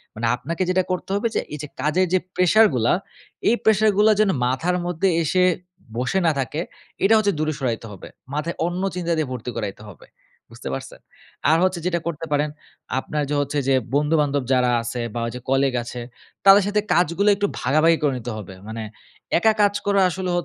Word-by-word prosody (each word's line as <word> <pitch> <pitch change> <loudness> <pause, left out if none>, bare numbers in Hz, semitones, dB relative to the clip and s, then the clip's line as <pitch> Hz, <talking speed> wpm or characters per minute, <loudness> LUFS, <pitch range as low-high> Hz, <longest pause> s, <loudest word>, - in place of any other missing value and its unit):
মানে 115 +2 -3
আপনাকে 160 +9 -3
যেটা 185 0 +2
করতে 185 - -3
হবে 205 +3 +1 0.3
এই 150 - -5
যে - - -5
কাজের 165 +5 +2
যে 185 - +4 0.2
pressure 215 +5 +5
গুলা, 120 -1 +2 0.6
এই 235 - +4
pressure 215 0 +4
গুলা 215 +1 +5
যেন 215 -2 +4 0.2
মাথার 165 +9 0
মধ্যে 175 +2 0
এসে 180 +4 +2 0.5
বসে 125 +10 0
না - - +5
থাকে, 135 +5 -2 0.4
এটা 200 +3 +5
হচ্ছে 205 -2 +2
দূরে 155 0 0
সরাইতে 120 -4 -2
হবে। 100 - -10 0.3
মাথায় 150 +4 -2
অন্য 175 +1 -2
চিন্তা 170 -2 -2
দিয়ে 155 -2 0
ভর্তি 125 -1 -5
করাইতে 105 -2 -5
হবে। 85 - -17 0.4
বুঝতে - - -7
পারছেন? 65 - -7 0.5
আর 160 - +5
হচ্ছে 185 -1 +1
যেটা 175 -1 +1
করতে 165 -1 -4
পারেন, 150 +1 +1 0.5
আপনার 150 +2 -3
য - - -4
হচ্ছে 145 +1 -1
যে 135 - +4 0.2
বন্ধু-বান্ধব 145 -2 +1
যারা 125 -1 +3
আছে 120 +1 -4
বা 120 - -3
ঐযে 125 +2 -6
colleague 135 -1 +2
আছে, 120 +1 -7 0.4
তাদের 195 +1 +8
সাথে 210 +1 +1
কাজগুলো 175 +4 +2
একটু 205 +1 0
ভাগাভাগি 155 +5 +3
করে 145 -2 +2
নিতে 120 0 -5
হবে। 95 -2 -8
মানে 110 0 -5 0.6
একা 220 +3 +4
কাজ 205 0 +4
করা 200 -1 +3
আসলে 185 +1 -4
155 Hz, 190 wpm, -22 LUFS, 125-185 Hz, 0.6 s, তাদের